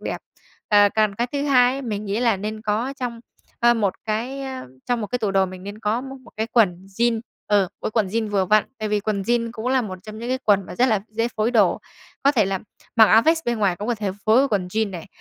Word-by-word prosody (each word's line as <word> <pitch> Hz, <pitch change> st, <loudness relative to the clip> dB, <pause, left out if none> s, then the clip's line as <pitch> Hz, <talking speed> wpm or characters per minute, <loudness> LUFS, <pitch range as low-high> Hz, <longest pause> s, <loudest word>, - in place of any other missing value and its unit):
đẹp. -, -, -4 dB, 0.5 s
Ờ, 205 Hz, -1 st, +6 dB
còn 215 Hz, -2 st, +2 dB
cái 240 Hz, +4 st, -1 dB
thứ 285 Hz, 0 st, -1 dB
hai 255 Hz, -3 st, +4 dB
ấy 275 Hz, -, -5 dB
mình 215 Hz, -3 st, -4 dB
nghĩ 205 Hz, +3 st, -2 dB
là 230 Hz, -4 st, +3 dB
nên 215 Hz, +2 st, -5 dB
có 220 Hz, +5 st, -1 dB
trong, 235 Hz, -2 st, -4 dB, 0.4 s
ơ, 240 Hz, 0 st, +5 dB
một 205 Hz, -5 st, 0 dB
cái, 240 Hz, +6 st, -3 dB
ơ, 265 Hz, -1 st, -6 dB, 0.2 s
trong 245 Hz, -1 st, 0 dB
một 210 Hz, -, -3 dB
cái 250 Hz, +4 st, -2 dB
tủ 210 Hz, -3 st, -1 dB
đồ 195 Hz, -1 st, +3 dB
mình 185 Hz, 0 st, -9 dB
nên 205 Hz, +2 st, -8 dB
có 220 Hz, +2 st, 0 dB
m 265 Hz, -, -8 dB, 0.2 s
một -, -, -15 dB
cái 220 Hz, +1 st, -1 dB
quần 190 Hz, -6 st, +2 dB
jeans, 235 Hz, -1 st, +2 dB, 0.3 s
ừ, 205 Hz, -1 st, +4 dB
một 185 Hz, -, -3 dB
cái -, -, -1 dB
quần 215 Hz, -3 st, +1 dB
jeans 220 Hz, +2 st, -1 dB
vừa 195 Hz, -2 st, +2 dB
vặn. 215 Hz, +3 st, +4 dB
Tại 215 Hz, -, -2 dB
vì 210 Hz, 0 st, +1 dB
quần 200 Hz, -1 st, -2 dB
jeans 230 Hz, +2 st, 0 dB
cũng 225 Hz, 0 st, -6 dB
là 260 Hz, -1 st, +2 dB
một 185 Hz, -4 st, -6 dB
trong 215 Hz, +1 st, -9 dB
những 235 Hz, +2 st, -5 dB
cái 260 Hz, -, 0 dB
quần 200 Hz, -3 st, +3 dB
mà -, -, -8 dB
rất 255 Hz, -, +4 dB
là 215 Hz, -4 st, +2 dB
dễ 230 Hz, +2 st, -1 dB
phối 215 Hz, +2 st, +1 dB
đồ, 215 Hz, -6 st, +3 dB, 0.4 s
có 280 Hz, +1 st, +4 dB
thể 220 Hz, -6 st, +3 dB
là 190 Hz, 0 st, -1 dB, 0.4 s
mặc 220 Hz, -, +9 dB
áo 220 Hz, +2 st, +6 dB
vest 325 Hz, +2 st, +2 dB
bên 235 Hz, -1 st, -1 dB
ngoài 195 Hz, -4 st, +1 dB
cũng 205 Hz, +3 st, -5 dB
có 240 Hz, -, +2 dB
thể 205 Hz, -3 st, -3 dB
phối 220 Hz, +1 st, +4 dB
với 275 Hz, +1 st, +3 dB
quần 200 Hz, -5 st, 0 dB
jeans 215 Hz, +1 st, -1 dB
này, 175 Hz, -3 st, -7 dB
220 Hz, 275 wpm, -22 LUFS, 205-240 Hz, 0.5 s, mặc